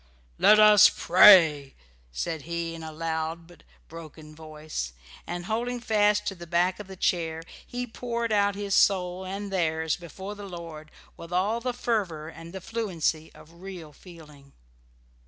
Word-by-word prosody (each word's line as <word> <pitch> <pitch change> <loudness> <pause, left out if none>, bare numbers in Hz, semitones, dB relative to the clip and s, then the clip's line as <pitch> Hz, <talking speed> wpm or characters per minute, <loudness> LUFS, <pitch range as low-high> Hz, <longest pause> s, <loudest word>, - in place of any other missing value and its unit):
"Let 215 - +6
us 210 -2 +8
pray!" 165 -7 +6 0.4
said 105 - -4
he, 170 0 -3
in 165 - -9
a 160 0 -7
loud 160 +1 -4
but 175 +1 -18 0.3
broken 155 -1 -12
voice; 155 - -7 0.3
and 175 0 -5
holding 240 +4 -2
fast 210 -2 +1
to - - -2
the 175 -2 -11
back 180 +3 +1
of 210 - -9
the 190 - -10
chair, 165 -3 -1 0.2
he 245 0 -5
poured 235 -1 -4
out 205 -1 +2
his 200 -1 -4
soul 185 -2 +2
and 195 +1 -6
theirs 160 -3 0
before 190 +4 -9
the 205 -1 -10
Lord 165 -3 -9 0.3
with 170 +1 -11
all 200 +6 0
the 250 +1 -2
fervour 200 -11 -3
and 165 +1 -11
the 190 +1 -8
fluency 170 -7 -3
of 170 +2 -17
real 180 -6 -9
feeling. 150 -5 -16
175 Hz, 155 wpm, -26 LUFS, 160-205 Hz, 0.4 s, us